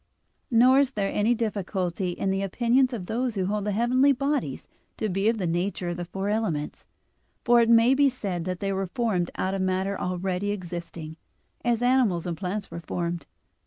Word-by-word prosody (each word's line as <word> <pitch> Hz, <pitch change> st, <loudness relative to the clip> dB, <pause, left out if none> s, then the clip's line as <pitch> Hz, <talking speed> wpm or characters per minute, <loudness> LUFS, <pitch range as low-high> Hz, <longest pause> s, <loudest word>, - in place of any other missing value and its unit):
Nor 255 Hz, +3 st, +6 dB
is 275 Hz, -1 st, +2 dB
there 200 Hz, -4 st, -1 dB
any 220 Hz, +4 st, +2 dB
difficulty 190 Hz, -5 st, -2 dB
in 190 Hz, +2 st, -1 dB
the 195 Hz, 0 st, 0 dB
opinion 240 Hz, +6 st, +2 dB
of 220 Hz, -7 st, -5 dB
those 235 Hz, +3 st, -2 dB
who 190 Hz, -2 st, 0 dB
hold 205 Hz, +1 st, -1 dB
the 210 Hz, -, 0 dB
heavenly 250 Hz, +6 st, +3 dB
bodies 280 Hz, +2 st, -1 dB, 0.3 s
to 215 Hz, -, -1 dB
be 195 Hz, +3 st, +1 dB
of 230 Hz, -, 0 dB
the 190 Hz, -, -2 dB
nature 175 Hz, +1 st, -1 dB
of 175 Hz, -, -3 dB
the 175 Hz, -, -4 dB
four 190 Hz, +3 st, -4 dB
elements, 200 Hz, -9 st, -2 dB, 0.6 s
for 240 Hz, 0 st, +6 dB
it 230 Hz, -, +2 dB
may 230 Hz, +2 st, +6 dB
be 280 Hz, +1 st, +4 dB
said 195 Hz, -9 st, -4 dB
that 185 Hz, -1 st, -4 dB
they 195 Hz, -1 st, -1 dB
were 195 Hz, 0 st, -2 dB
formed 185 Hz, -4 st, -1 dB
out 190 Hz, +1 st, -1 dB
of 195 Hz, -, -1 dB
matter 190 Hz, +1 st, -1 dB
already 185 Hz, +2 st, -2 dB
existing, 170 Hz, -4 st, -6 dB, 0.5 s
as 240 Hz, -1 st, +1 dB
animals 245 Hz, -9 st, +2 dB
and 175 Hz, -2 st, -2 dB
plants 195 Hz, +4 st, -4 dB
were -, -, -5 dB
formed. 170 Hz, 0 st, -3 dB
200 Hz, 195 wpm, -26 LUFS, 180-235 Hz, 0.6 s, Nor